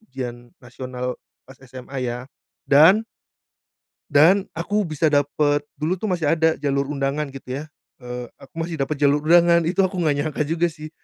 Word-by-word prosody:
ujian 120 Hz, -, -7 dB
nasional 125 Hz, 0 st, -6 dB, 0.2 s
pas 130 Hz, -, -14 dB
SMA 130 Hz, +1 st, -8 dB
ya 125 Hz, 0 st, -3 dB, 0.4 s
dan 165 Hz, +10 st, +6 dB, 1.1 s
Dan 180 Hz, +7 st, +5 dB
aku 200 Hz, +5 st, -1 dB
bisa 155 Hz, 0 st, 0 dB
dapat 145 Hz, 0 st, +1 dB
dulu 160 Hz, +5 st, -2 dB
tuh 215 Hz, -, -3 dB
masih 170 Hz, -6 st, 0 dB
ada 160 Hz, -1 st, +3 dB
jalur 140 Hz, -1 st, 0 dB
undangan 140 Hz, +1 st, -2 dB
gitu 130 Hz, -1 st, -6 dB
ya, -, -, -5 dB, 0.4 s
eee, 125 Hz, -1 st, -7 dB
aku 135 Hz, -, -17 dB
masih 165 Hz, -1 st, -4 dB
dapat 135 Hz, +3 st, -1 dB
jalur 145 Hz, 0 st, +4 dB
undangan. 170 Hz, 0 st, +5 dB
Itu 180 Hz, +3 st, +2 dB
aku 190 Hz, -1 st, -1 dB
enggak 155 Hz, -4 st, +2 dB
nyangka 150 Hz, 0 st, -2 dB
juga 165 Hz, +2 st, 0 dB
sih. 155 Hz, 0 st, -10 dB
150 Hz, 165 wpm, -22 LUFS, 135-170 Hz, 1.1 s, dan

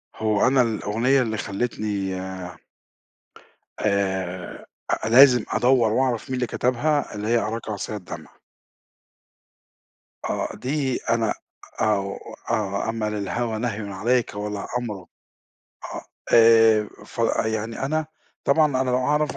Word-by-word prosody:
هو 110 Hz, +1 st, +2 dB
أنا 130 Hz, 0 st, +4 dB
الأغنية 115 Hz, +3 st, +1 dB
اللي 110 Hz, -3 st, -1 dB
خلّتني 100 Hz, -3 st, -2 dB, 1.6 s
آآ 95 Hz, -3 st, -2 dB, 0.4 s
لازم 125 Hz, 0 st, +7 dB
أدوّر 120 Hz, -3 st, +3 dB
وأعرف 130 Hz, 0 st, 0 dB
مين 130 Hz, -, -1 dB
اللي 125 Hz, -1 st, -1 dB
كتبها 130 Hz, +4 st, 0 dB
اللي 105 Hz, +1 st, -4 dB
هي 120 Hz, +1 st, +3 dB
أراكَ 115 Hz, 0 st, -3 dB
عَصِيَّ 105 Hz, +1 st, -4 dB
الدمْع. 90 Hz, -4 st, -8 dB, 2.0 s
آه -, -, -2 dB
دي 135 Hz, -1 st, -1 dB
أنا 115 Hz, -2 st, +2 dB, 0.5 s
آه 100 Hz, -2 st, 0 dB, 0.3 s
آه 100 Hz, 0 st, -1 dB
أما 110 Hz, -1 st, -1 dB
للهَوَى 110 Hz, +2 st, -2 dB
نَهْيٌ 110 Hz, -3 st, -3 dB
عليك 115 Hz, +3 st, 0 dB
ولا 105 Hz, -1 st, -4 dB
أمْرُ، 115 Hz, -4 st, -4 dB, 1.0 s
آه -, -, -5 dB, 0.3 s
آآ 115 Hz, -2 st, +6 dB, 0.2 s
ف -, -, -15 dB, 0.3 s
يعني 110 Hz, +3 st, -2 dB
أنا 155 Hz, +2 st, -1 dB, 0.4 s
طبعًا 155 Hz, +2 st, +4 dB, 0.2 s
أنا 130 Hz, -, -1 dB
لو 125 Hz, -, +2 dB
أعرف 150 Hz, +3 st, 0 dB
115 Hz, 115 wpm, -24 LUFS, 105-125 Hz, 2.0 s, لازم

